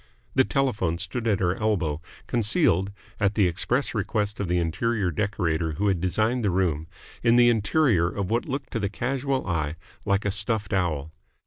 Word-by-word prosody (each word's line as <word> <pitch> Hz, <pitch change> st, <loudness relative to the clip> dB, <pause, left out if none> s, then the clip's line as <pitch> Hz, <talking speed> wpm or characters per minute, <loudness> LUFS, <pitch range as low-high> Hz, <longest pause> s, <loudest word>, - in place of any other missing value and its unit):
The 130 Hz, -, +5 dB
telephone 115 Hz, -, 0 dB
stood 100 Hz, +7 st, -3 dB
at 105 Hz, -4 st, +2 dB
her 90 Hz, -1 st, +2 dB
elbow, 85 Hz, -8 st, 0 dB, 0.2 s
concealed 105 Hz, -, +2 dB, 0.3 s
at 100 Hz, -1 st, +1 dB
the 105 Hz, -, +4 dB
express 120 Hz, +10 st, 0 dB
request 105 Hz, -1 st, -1 dB
of 100 Hz, -, -1 dB
the 90 Hz, +1 st, +1 dB
interior 90 Hz, +4 st, 0 dB
decorator 85 Hz, -4 st, -1 dB
who 100 Hz, +7 st, 0 dB
had 90 Hz, -4 st, 0 dB
designed 110 Hz, +6 st, +1 dB
the 105 Hz, -, +2 dB
room 85 Hz, -4 st, 0 dB, 0.3 s
in 115 Hz, 0 st, +4 dB
the 120 Hz, 0 st, +6 dB
interior 110 Hz, -, +2 dB
of 100 Hz, +1 st, -3 dB
what 120 Hz, +1 st, 0 dB
looked 135 Hz, +1 st, -4 dB
to 115 Hz, -, -1 dB
the 100 Hz, -2 st, -1 dB
casual 130 Hz, +4 st, -1 dB
eye 80 Hz, -3 st, -1 dB, 0.3 s
like 100 Hz, -1 st, +1 dB
a 100 Hz, -, +1 dB
stuffed 105 Hz, 0 st, -2 dB
owl. 80 Hz, -5 st, 0 dB
100 Hz, 180 wpm, -25 LUFS, 90-115 Hz, 0.3 s, the